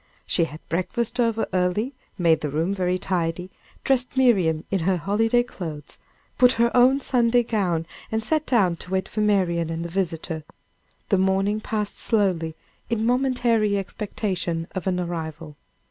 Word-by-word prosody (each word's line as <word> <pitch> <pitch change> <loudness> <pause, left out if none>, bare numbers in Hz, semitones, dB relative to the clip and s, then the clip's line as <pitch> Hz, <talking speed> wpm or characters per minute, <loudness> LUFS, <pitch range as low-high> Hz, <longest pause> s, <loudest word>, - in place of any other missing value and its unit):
She 170 - +1
had 155 0 -11
breakfast 230 +8 -2
over 230 -2 +2
early, 185 +8 0 0.2
made 165 -3 +3
the 150 - -2
room 160 +7 0
very 185 -2 0
tidy, 180 -1 -2 0.3
dressed 260 0 0
Miriam 185 -12 +3
in 195 - +1
her 180 +2 +1
holiday 225 +7 +2
clothes, 160 -10 -8 0.4
put 250 -2 +5
on 235 - +6
her 235 - -1
own 255 +3 +5
Sunday 245 -2 +2
gown, 185 -8 0 0.3
and 220 0 -1
sat 310 +4 0
down 190 -9 +3
to 180 - -10
wait 190 0 -1
for 215 - -3
Marian 180 -6 +2
and 165 +1 -3
the - - -5
visitor. 165 -3 -2 0.7
The 195 - +3
morning 195 +3 +1
passed 210 -2 -3
slowly, 180 -8 +1 0.3
in 225 -1 0
momentary 240 -4 +2
expectation 185 -4 -3
of 185 -1 -4
an 180 -1 +1
arrival. 160 -3 -5
190 Hz, 160 wpm, -24 LUFS, 170-230 Hz, 0.7 s, on